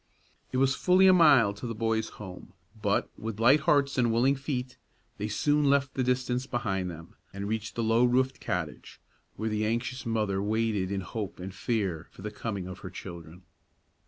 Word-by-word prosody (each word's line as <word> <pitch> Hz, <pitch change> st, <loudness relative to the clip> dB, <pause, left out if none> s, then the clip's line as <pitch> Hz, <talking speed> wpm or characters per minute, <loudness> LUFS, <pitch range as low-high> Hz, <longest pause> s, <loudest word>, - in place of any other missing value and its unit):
It 130 Hz, -, -1 dB
was 135 Hz, +1 st, +3 dB
fully 185 Hz, +5 st, +4 dB
a 190 Hz, -, +8 dB
mile 140 Hz, -, +6 dB
to 100 Hz, +5 st, -7 dB
the 115 Hz, -, -4 dB
boys' 110 Hz, 0 st, 0 dB
home; 95 Hz, -3 st, -10 dB, 0.3 s
but, -, -, 0 dB
with 110 Hz, -1 st, -5 dB
light 130 Hz, +6 st, +6 dB
hearts 140 Hz, -2 st, +2 dB
and 120 Hz, -2 st, +3 dB
willing 125 Hz, +5 st, +3 dB
feet, 130 Hz, -2 st, -4 dB, 0.4 s
they 105 Hz, -, -2 dB
soon 145 Hz, +7 st, +1 dB
left 140 Hz, -1 st, +2 dB
the 130 Hz, -, 0 dB
distance 125 Hz, 0 st, 0 dB
behind 100 Hz, -7 st, -2 dB
them, 85 Hz, 0 st, -10 dB, 0.2 s
and 100 Hz, +1 st, -5 dB
reached 110 Hz, 0 st, -3 dB
the 115 Hz, -, -1 dB
low 115 Hz, +2 st, +3 dB
roofed 130 Hz, +2 st, +2 dB
cottage, -, -, -4 dB, 0.4 s
where 110 Hz, -, -3 dB
the 105 Hz, 0 st, -1 dB
anxious 120 Hz, +4 st, -2 dB
mother 105 Hz, -4 st, 0 dB
waited 105 Hz, -2 st, 0 dB
in 100 Hz, -1 st, -1 dB
hope 100 Hz, +2 st, -5 dB
and 95 Hz, +1 st, -6 dB
fear 95 Hz, -5 st, -2 dB
for -, -, -14 dB
the 105 Hz, -, -4 dB
coming 100 Hz, -3 st, -4 dB
of 95 Hz, +1 st, -8 dB
her 95 Hz, -, -7 dB
children. 85 Hz, -1 st, -10 dB
115 Hz, 190 wpm, -28 LUFS, 100-130 Hz, 0.4 s, a